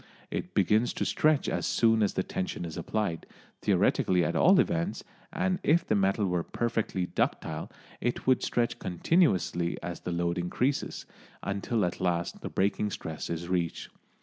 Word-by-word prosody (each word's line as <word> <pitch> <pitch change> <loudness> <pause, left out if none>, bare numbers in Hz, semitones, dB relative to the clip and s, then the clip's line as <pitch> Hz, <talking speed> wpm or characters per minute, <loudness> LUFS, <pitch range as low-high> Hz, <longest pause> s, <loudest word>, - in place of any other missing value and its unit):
It 90 - -4
begins 105 +4 +3
to - - -2
stretch 155 -2 +2
as - - -1
soon 115 -1 +3
as 105 - +1
the 95 - +1
tension 90 -2 -3
is 80 - -6
applied, 85 0 -2 0.3
theoretically 90 -2 +2
at - - -1
all 185 +2 +6
events, 175 +2 0 0.3
and 185 -1 0
if 165 +4 +3
the - - +1
metal 100 +1 +2
were 90 -2 0
perfectly 110 -2 -1
ductile - - -2 0.3
it 120 +1 -2
would 130 -1 +4
stretch 120 -1 0
continuously 90 - +1
as 85 -1 -4
the 90 - -5
load 85 +1 0
increases, 125 +11 -1 0.4
until 100 +2 0
at 90 - -4
last 85 -2 -1
the - - -5
breaking 100 +2 0
stress 80 -5 -5
is 85 0 -3
reached. 85 -2 -1
95 Hz, 160 wpm, -29 LUFS, 85-120 Hz, 0.4 s, all